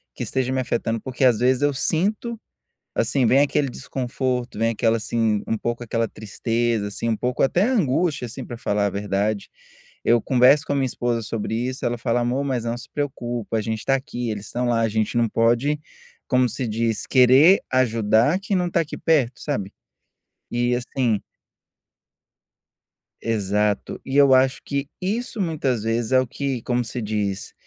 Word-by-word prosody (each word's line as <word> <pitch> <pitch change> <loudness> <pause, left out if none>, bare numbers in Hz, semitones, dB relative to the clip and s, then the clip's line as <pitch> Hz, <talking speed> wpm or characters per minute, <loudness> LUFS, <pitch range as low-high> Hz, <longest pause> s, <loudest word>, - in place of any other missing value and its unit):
que - - -4
esteja 130 -1 -1
me 130 - 0
afetando, 115 -2 -1
porque 130 0 -3
às 120 -4 +4
vezes 125 +2 +2
eu 145 -1 +3
sinto, 210 - -1 0.6
assim, 135 -3 +1
vem 130 +4 +5
aquele 145 -1 +2
desconforto, 125 -2 -3
vem 115 +1 +2
aquela, 115 0 +1
assim, 110 -2 0
um 110 - 0
pouco 120 +2 -3
aquela 115 0 0
tristeza, 115 +1 -2
assim, 110 +3 -4
um 115 - +1
pouco 125 +3 -1
até 175 +7 +3
angústia, 175 - +1
assim, 130 +3 -7
para 120 - -8
falar 105 -5 0
a - - 0
verdade. 100 +1 -2 0.5
Eu 120 0 +4
converso 130 +3 +5
com - - -1
a - - 0
minha 135 -1 +1
esposa 120 -1 -1
sobre 110 0 -3
isso, 125 +3 -3
ela 120 0 -1
fala 115 +1 0
amor 125 +4 0
mas 130 -4 -1
não 115 0 -2
se 120 - -11
preocupa, 120 -6 -3
a - - 0
gente 110 +1 -2
está 135 - +1
aqui, 125 -4 -4
eles 105 -1 -5
estão 125 0 -2
lá, 115 -1 +2
a 115 - +2
gente 110 +1 -1
não 115 - +2
pode, 120 +7 +1 0.5
como 125 -1 +3
se 125 +2 -3
diz 115 0 -1
querer 135 +8 +6
ajudar 115 - +3
quem 200 -1 -1
não 180 - +1
está 170 - +1
aqui 155 - -4
perto, 135 -7 +1
sabe? 105 -10 -3 0.8
E 120 +1 +1
assim 120 -3 -1 2.0
Exato, 105 -2 -1
e 135 - -4
eu 140 -2 +6
acho 130 +1 +3
que 140 -1 -3
isso 215 +3 -2
muitas 140 - -1
vezes 115 +2 -1
é 130 - +6
o - - -2
que, 135 -1 -3
como 120 0 -1
se 120 +2 -5
diz, 105 -2 -3
120 Hz, 180 wpm, -23 LUFS, 115-135 Hz, 2.0 s, querer